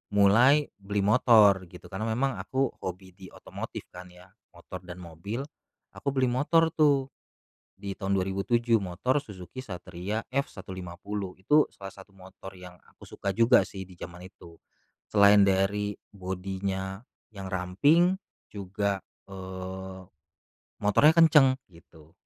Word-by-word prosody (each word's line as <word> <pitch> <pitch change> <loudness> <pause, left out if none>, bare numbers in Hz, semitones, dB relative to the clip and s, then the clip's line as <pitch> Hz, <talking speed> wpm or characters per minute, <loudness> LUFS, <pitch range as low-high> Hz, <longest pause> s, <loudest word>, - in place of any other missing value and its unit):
mulai 120 +9 +5
beli 100 0 -2
motor 105 -4 +5
gitu, 90 +1 -14
karena 100 +4 -3
memang 125 +4 -1
aku 130 0 -1
hobi 95 0 -7
di 95 +1 -13
otomotif - - -8
kan 90 +1 -10
ya, 90 +1 -17 0.2
motor 85 +2 -9
dan 90 - -7
mobil, 85 +10 -6 0.5
aku - - -12
beli 130 -2 +2
motor 160 +5 +2
tuh 140 -4 +2 0.6
di 100 0 -7
tahun 95 0 -2
2007, 100 +5 +1
motor 100 +7 -1
Suzuki 105 -4 -8
Satria 95 +2 -5
F150. 95 -6 -5
Itu 150 +9 +4
salah 100 -1 -9
satu 95 +1 -15
motor 95 0 -12
yang 90 -1 -12
aku - - -17
suka 100 - -3
juga 115 -1 +5
sih 95 +2 -9
di 90 - -15
zaman 90 +1 -9
itu. 85 -3 -17 0.5
Selain 100 0 +6
dari 100 +1 +1 0.2
body-nya 95 +1 -4 0.3
yang 95 -2 -7
ramping, 125 - +3 0.4
juga, 100 0 -2 0.3
eee, 95 0 -7 0.8
motornya 125 +9 +5
kenceng 150 -5 +6 0.2
gitu. 80 -1 -19
100 Hz, 130 wpm, -27 LUFS, 95-115 Hz, 0.8 s, Selain